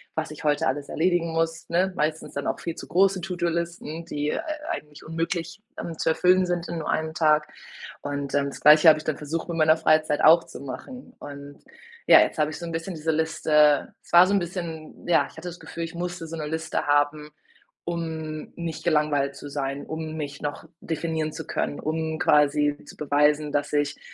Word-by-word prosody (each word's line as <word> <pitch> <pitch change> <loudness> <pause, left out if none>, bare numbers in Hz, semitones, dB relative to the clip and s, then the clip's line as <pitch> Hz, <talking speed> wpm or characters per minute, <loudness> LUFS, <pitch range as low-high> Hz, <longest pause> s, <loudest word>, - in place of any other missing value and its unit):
was 160 -1 -3
ich 155 - -9
heute 145 -2 +2
alles 140 +2 -2
erledigen 170 0 +1
muss, 165 0 -1
ne? 185 +3 +1
Meistens 155 +1 -2
dann 140 - -3
auch - - -2
viel 170 - -4
zu - - -9
große 190 +1 +3
To-do 180 -1 -2
´-Listen, 170 -1 -4
die, 150 -2 -2
äh, - - -1
äh, - - -2 0.3
eigentlich 150 0 -7
unmöglich, 170 +3 -3 0.2
ähm, 165 -2 -6
zu - - -2
erfüllen 180 +3 +4
sind 175 -1 -2
in 170 - -3
nur 160 - -4
1 160 0 -1
Tag. 155 -1 +3 0.5
Und, 140 -1 -4
ähm, 140 -1 +2
das 140 - -7
Gleiche 155 +2 +7
habe 155 -1 +8
ich - - -10
dann 155 -2 -2
versucht 160 +4 -4
in 170 - -3
meiner 155 0 +5
Freizeit 155 -2 +2
auch 165 +2 +7
zu - - -10
machen. 250 - -9
Und 145 0 -10 0.5
ja, - - +9
jetzt - - 0
habe 150 0 +2
ich - - -6
so 170 - -6
'n 170 - -5
bisschen 165 +3 -4
diese 160 +1 -1
Liste 155 -2 +3
es - - -21
war 175 +1 +9
so 200 - +1
'n 200 - +4
bisschen 170 -3 -6
ja, 175 - +4
ich - - -18
hatte 170 +2 -6
das 175 - -10
Gefühl, 170 - -6
ich 165 +1 -6
musste 175 -1 -4
so 165 +1 -6
'ne 155 -1 -4
Liste 160 +1 -2
haben, 145 +1 +1 0.6
um 160 -2 -5
nicht 170 -2 -5
gelangweilt 150 -4 +1
zu 145 - -9
sein, 140 0 -3
um 160 0 -5
mich 145 -2 -5
noch 145 -1 -4
definieren 160 -1 -3
zu - - -7
können, 145 - -2
um 160 0 -2
quasi 145 0 +3
zu - - -12
beweisen, 150 +1 +2
dass 145 +1 -1
ich 145 0 0
160 Hz, 210 wpm, -25 LUFS, 150-170 Hz, 0.6 s, ja